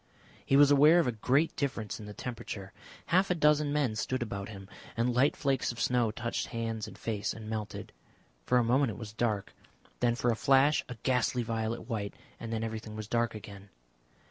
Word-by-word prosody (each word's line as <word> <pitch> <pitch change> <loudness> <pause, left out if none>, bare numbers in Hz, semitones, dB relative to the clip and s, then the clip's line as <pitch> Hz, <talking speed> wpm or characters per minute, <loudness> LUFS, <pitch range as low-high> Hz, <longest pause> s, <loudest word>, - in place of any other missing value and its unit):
He 135 - +2
was 145 0 +7
aware 150 +4 +7
of 170 - +3
a 125 - +1
great 130 +8 +1
difference 120 -8 -3
in 105 - -9
the 105 - -7
temperature. 100 -5 -6 0.4
Half 190 +2 +4
a 180 - +2
dozen 150 -2 +3
men 145 -7 +1
stood 120 +5 -1
about 100 -3 -5
him, 95 -3 -9 0.3
and 120 +2 +1
light 130 +4 +3
flakes 135 -3 0
of 120 - -10
snow 120 -1 +2
touched 115 +2 -3
hands 115 -2 -3
and - - -11
face 105 -3 -2
and 110 -1 -9
melted. 110 -1 -5 0.5
For 125 - +2
a 120 - +4
moment 130 +3 +3
it 105 - -6
was 110 -2 -8
dark, 110 -3 -1 0.5
then 120 -1 +2
for 120 0 +1
a - - 0
flash 140 +4 +4
a 125 - -6
ghastly 125 -1 +1
violet 115 0 -3
white, 105 -4 -3 0.2
and 115 - -6
then 115 0 -2
everything 110 -1 -5
was 110 -1 -6
dark 115 0 0
again. 100 -1 -10
115 Hz, 200 wpm, -30 LUFS, 110-130 Hz, 0.5 s, was